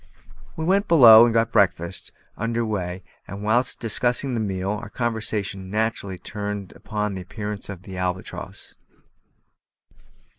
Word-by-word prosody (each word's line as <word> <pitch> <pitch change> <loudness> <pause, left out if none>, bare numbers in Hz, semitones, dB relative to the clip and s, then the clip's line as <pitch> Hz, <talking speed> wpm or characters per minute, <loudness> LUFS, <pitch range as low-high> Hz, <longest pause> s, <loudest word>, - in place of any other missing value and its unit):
We 160 - -2
went 195 +4 +2
below 120 -8 +9
and 120 - +1
got 115 -1 +2
breakfast 90 -2 +1 0.2
under 115 +1 -1
weigh; 95 -4 -3 0.2
and 100 +2 -7
whilst 120 +4 +2
discussing 120 +4 0
the 120 - -1
meal, 95 -2 -2
our 105 0 -5
conversation 105 -5 -2
naturally 105 -2 -2
turned 105 -1 -5
upon 105 -1 -4
the 95 - -5
appearance 105 +2 -6
of 95 -3 -8
the 95 -1 -8
Albatross. 90 0 -5
105 Hz, 135 wpm, -23 LUFS, 95-115 Hz, 0.2 s, below